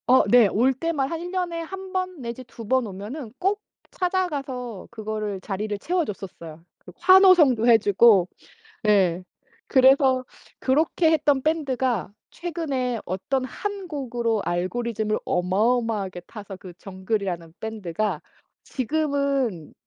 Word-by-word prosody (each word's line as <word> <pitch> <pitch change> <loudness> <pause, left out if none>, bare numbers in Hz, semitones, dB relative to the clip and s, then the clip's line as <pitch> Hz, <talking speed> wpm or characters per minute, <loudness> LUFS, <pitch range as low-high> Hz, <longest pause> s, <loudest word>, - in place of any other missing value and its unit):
어 255 +1 +6
네. 240 -3 +6
올 245 +7 +2
때만 280 -1 -1
한 330 - -3
1 350 - -5
년에 355 -3 -2
1 380 +3 -8
번 370 -4 -3
내지 235 +1 -6
2 230 -1 -11
번 260 0 +2
오면은 215 +6 -7
꼭 400 +2 0 0.3
찾아가서 280 - -3
그거를 215 -3 -4
자리를 205 +2 -3
채워 350 - 0
줬었어요. 170 - -9 0.2
그 180 - -14
환호성도 360 - +6
해주고. 210 -3 +5 0.6
네. 190 -4 +3 0.4
그래서 265 -1 +5 0.4
그렇게 315 +4 +2
했던 290 -4 +2
밴드가 260 - 0 0.2
최근에 280 -8 -3
어떤 225 +9 -2
1 400 +6 -5
곡으로 240 -7 -1
알고리즘을 215 +4 -1
어마어마하게 200 0 0
타서 205 -3 -9
그 185 -1 -11
정글이라는 190 -4 -4
밴드가 210 -5 -3 0.4
지금은 275 - -1
245 Hz, 255 characters per minute, -24 LUFS, 205-300 Hz, 0.6 s, 어